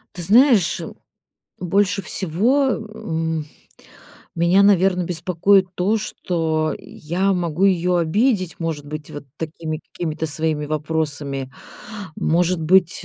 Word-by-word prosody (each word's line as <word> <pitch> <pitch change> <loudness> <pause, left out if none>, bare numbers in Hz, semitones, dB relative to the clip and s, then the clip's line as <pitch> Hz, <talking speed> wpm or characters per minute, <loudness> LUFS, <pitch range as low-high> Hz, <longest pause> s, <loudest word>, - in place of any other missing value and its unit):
Ты 175 - -5
знаешь, 225 - +4 0.8
больше 195 +2 +1
всего, 220 - +1
м, 160 -9 -3 0.9
меня, 175 +4 +4
наверно, 190 -2 +4
беспокоит 180 +3 +2
то, 200 +5 +1
что 160 -6 -1
я 185 +5 -2
могу 175 0 -1
её 180 -2 +2
обидеть, 185 - +1
может 160 -3 -3
быть, 150 0 -7
вот 145 - -8
такими 160 0 -5
какими-то 160 -2 -3
своими 155 0 -1
вопросами. 145 -3 -3 0.6
Может 175 +1 +1
быть, 175 +1 +3
170 Hz, 105 wpm, -21 LUFS, 155-190 Hz, 0.9 s, знаешь